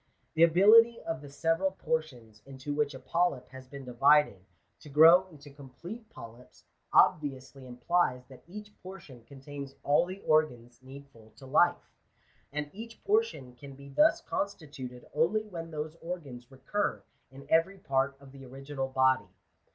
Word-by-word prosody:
The 160 - -1
ability 215 +8 +6
of 165 -2 -5
the 145 - -11
several 165 +6 0
portions 125 - -4
into 135 +1 -6
which 145 -1 -1
a - - -9
polyp 170 -7 -1
has 130 0 -12
been 140 0 -10
divided, 130 -4 +3 0.4
to 150 - -13
grow 165 +6 +7
into 145 -4 -15
complete 160 - -11
polyps, 115 - -14 0.3
obviously 135 -2 +1
implies 125 +1 0
that 130 - -15
each 210 +3 -10
portion 175 -10 -12
con 135 -1 -13
tains 140 -1 -8
all 150 +4 +3
the 185 +2 -7
organs 125 -7 0
needful 130 -4 -15
to 135 - -14
life; 150 +6 +2 0.6
and 150 0 -4
each 225 +3 -11
portion 410 - -1
can 135 +2 -12
be 140 +1 -13
thus 200 +10 +3
constituted 140 -10 -6
only 170 +9 +1
when 165 -5 -8
those 155 0 -6
organs 140 -9 -8
recur 135 +10 -3 0.3
in 135 +1 -13
every 165 +6 +2
part 135 -4 -1
of 140 -1 -15
the 135 0 -13
original 135 +1 -6
body. 130 -6 +2
145 Hz, 150 wpm, -29 LUFS, 130-170 Hz, 0.6 s, grow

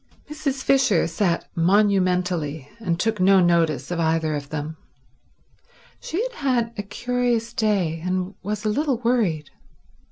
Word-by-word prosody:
Mrs. 280 -3 -3
Fisher 265 -10 +3
sat 170 +1 -1
monumentally, 180 -5 +1
and 170 -6 -2
took 220 +1 0
no 190 +1 +5
notice 165 -5 +2
of 175 - -2
either 160 -1 +1
of 140 -1 -6
them. 155 +1 -5 1.2
She 335 - -4
had - - -3
had 250 - 0
a 205 - -3
curious 240 +2 -1
day, 200 -9 0
and 185 +1 -2
was 210 +2 -4
a - - +2
little 275 +3 0
worried. 220 -11 0
190 Hz, 135 wpm, -23 LUFS, 165-235 Hz, 1.2 s, no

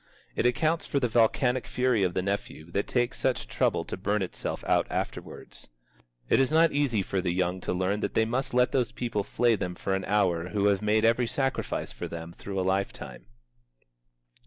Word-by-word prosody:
It - - +2
accounts 160 +7 +1
for 140 - 0
the 125 - +1
volcanic 120 +2 +2
fury 125 -3 +1
of 90 -2 +1
the 95 - 0
nephew 95 -4 -4
that 100 +3 -1
takes 120 0 0
such 130 - 0
trouble - - 0
to - - -5
burn 100 +1 0
itself 90 - -5
out - - +3
afterwards. - - -6 0.6
It - - +4
is 135 - +3
not 165 +1 +5
easy 135 -8 +1
for 95 0 -1
the 90 -1 0
young 90 +1 -1
to - - -2
learn 95 +3 0
that - - -3
they 110 - +4
must 125 +2 -2
let 125 0 +4
those 125 -3 +1
people 120 -5 -2
flay 120 +2 +2
them 90 -3 -4
for 95 - -2
an 95 -1 -1
hour 90 -4 +1
who 100 0 0
have 100 -1 +1
made 110 +1 +2
every 115 +1 +3
sacrifice 135 +2 -2
for - - -6
them 85 0 -7
through 100 +1 -5
a 95 - 0
life 95 +1 +1
time. - - -10
105 Hz, 205 wpm, -28 LUFS, 95-125 Hz, 0.6 s, not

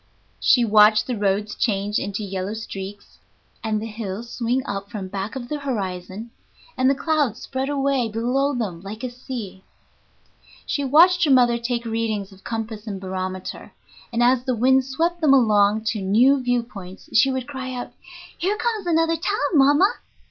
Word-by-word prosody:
She 245 -2 +4
watched 215 0 +5
the 250 - -2
roads 205 0 0
change 205 -1 0
into 200 +1 -4
yellow 195 +1 -4
streaks, 200 -2 -8 0.4
and 215 -1 0
the 220 - -5
hills 220 0 -6
swing 250 +3 -1
up 200 -3 -5
from 195 -3 -6
back 200 +4 -4
of 245 -2 -5
the 300 +3 -3
horizon, 205 -4 -4 0.4
and 260 +1 +3
the 275 - +3
clouds 290 -7 0
spread 265 +1 -3
away 275 -4 0
below 255 +6 0
them 195 -8 -3
like 210 +4 -8
a 250 - -3
sea. 230 -7 -7 1.0
She 285 - -1
watched 340 +6 +5
her - - 0
mother 245 -3 +4
take 235 0 -2
readings 220 -3 -2
of 195 0 -17
compass 225 -1 -5
and 200 -2 -4
barometer, 185 0 -5 0.4
and 235 +1 +1
as 250 0 +3
the 255 -1 -1
wind 260 +3 +3
swept 335 +6 -1
them 285 -3 +5
along 215 -3 +3
to 215 - -4
new 245 +8 +4
view 245 -1 +1
points 195 -5 -11
she 245 +5 +5
would 260 -1 -3
cry 265 -2 -5
out, 250 -1 -6 0.4
"Here 395 +5 -1
comes 440 -5 -2
another 330 0 +2
town, 365 +5 -2 0.2
mama!" 290 - +5
235 Hz, 170 wpm, -22 LUFS, 205-265 Hz, 1.0 s, watched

